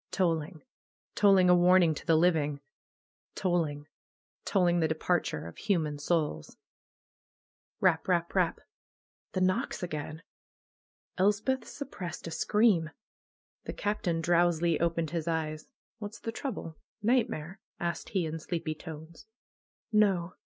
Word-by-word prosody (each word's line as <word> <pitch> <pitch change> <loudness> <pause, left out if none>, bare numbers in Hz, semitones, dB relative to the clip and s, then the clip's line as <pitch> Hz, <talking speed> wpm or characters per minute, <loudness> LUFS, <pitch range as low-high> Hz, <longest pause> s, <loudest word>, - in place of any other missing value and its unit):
Tolling! 165 -2 -1 0.5
Tolling 195 -3 +5
a 180 - +7
warning 175 -1 +5
to - - -8
the 165 - +5
living! 155 -4 +2 0.8
Tolling! 165 -6 0 0.6
Tolling 175 -3 +3
the 160 - +3
departure 160 - -1
of 85 - -10
hu 200 -3 +2
man 150 -3 -3
souls! 150 - -1 1.2
Rap! 175 -4 +2
Rap! 170 -2 +1
Rap! 180 -4 +1 0.7
The 185 - -1
knocks 185 0 0
again! 155 -1 -5 1.0
Elspeth 210 +7 +1
suppressed 190 - -7
a 165 - -5
scream. 205 -4 +3 0.8
The - - -4
Captain 195 -5 -1
drowsily 170 -1 +2
opened 165 -2 0
his 170 -1 -3
eyes. 155 +4 -2 0.3
What's 210 +1 -7
the 225 - -4
trouble? 225 - -5 0.3
Nightmare?" 220 -8 0 0.2
asked 170 -1 -3
he 185 -4 0
in 160 +1 -4
sleepy 160 -1 -3
tones. 160 +3 -10 0.7
''No! 190 -4 +3
170 Hz, 120 wpm, -30 LUFS, 160-190 Hz, 1.2 s, a